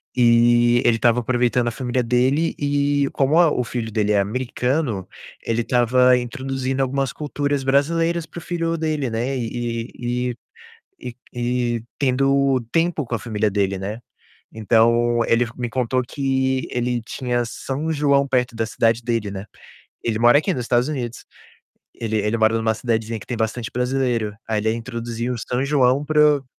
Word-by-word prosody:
e 120 0 +4
ele 120 - +4
estava 120 +1 +3
aproveitando 120 0 +1
a - - 0
família 125 +1 -2
dele 130 +7 +1
e 145 0 +1
como 140 +4 +2
a 165 -4 +5
o 125 - 0
filho 115 -2 -4
dele 105 -1 +1
é 100 - +3
americano, 125 - -1 0.4
ele 115 0 0
estava 125 +1 +3
introduzindo 130 +1 -3
algumas 135 0 -1
culturas 145 -2 -2
brasileiras 165 +5 +1
para 170 - -9
o - - -12
filho 165 -1 -2
dele, 155 -5 -1
né, 125 +4 -2
e 115 0 -4 0.4
e - - -16 0.6
e 125 -2 -8 0.2
e 120 -1 -1
tendo 135 0 +2
tempo 165 -3 +1
com 120 - -4
a 115 - 0
família 105 -1 -1
dele, 100 -1 0
né. 105 +4 -5 0.5
Então 115 +2 +3
ele 120 +1 +2
f 115 - -10
me 120 -1 -3
contou 125 +1 0
que 130 -1 -1
ele 120 -1 -1
tinha 120 0 -2
São 140 +7 -4
João 140 -2 +2
perto 125 -2 0
da 115 - 0
cidade 115 +1 +1
dele, 115 -4 -2
né. 100 +1 -6 0.6
Ele 115 -2 0
mora 120 +4 +6
aqui 190 +5 -1
nos 125 - -3
Estados 120 +2 +1
Unidos. 125 -6 -5 0.7
Ele 110 -2 -2
ele 105 +2 0
mora 110 0 +3
numa 110 0 +1
cidadezinha 110 -1 -2
que - - -12
tem 120 - -3
bastante 110 +1 -2
brasileiro. 125 -4 -1
Aí 110 - 0
ele 110 +1 +1
introduziu 115 +1 -4
o - - -6
São 125 +4 -2
João 140 -1 +2
para 150 -1 +4
o 135 - -16
125 Hz, 170 wpm, -21 LUFS, 115-135 Hz, 0.7 s, mora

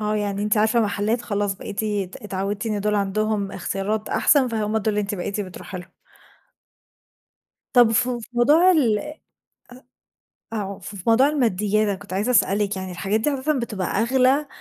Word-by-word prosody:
آه 210 0 -1
يعني 205 -1 -2
أنتِ 210 +1 +1
عارفة 220 +2 +3
محلات 215 +2 0
خلاص 205 -3 -1
بقيتِ 200 +2 -5
أت 205 -4 -3
اتعوّدتِ 200 +1 -4
إن 210 -2 -1
دول 210 +1 0
عندهم 205 0 -1
إختيارات 195 +4 -3
أحسن، 275 -4 +3
فهُم 220 -2 -1
دول 220 - -2
اللي 210 0 0
أنتِ 205 0 -3
بقيتِ 200 +2 -3
بتروحي 185 -1 -7
لهم. 180 0 -12 1.8
طب 240 -2 +6
فو 245 +2 +1
في 225 - -11
موضوع 295 +10 +5
الأ 300 - +1 1.3
أو 200 -3 -4
في 200 +1 -9
في 190 - -8
موضوع 235 +5 +5
الماديات 215 -7 +1
أنا 200 - 0
كنت 205 0 -13
عايزة 205 +6 0
اسألِك، 205 -3 +2
يعني 190 -1 -5
الحاجات 195 +5 -1
دي 295 +5 0
أساسًا 280 +2 -1
بتبقى 210 -6 -3
أغلى 260 +5 +2
210 Hz, 170 wpm, -23 LUFS, 200-235 Hz, 1.8 s, طب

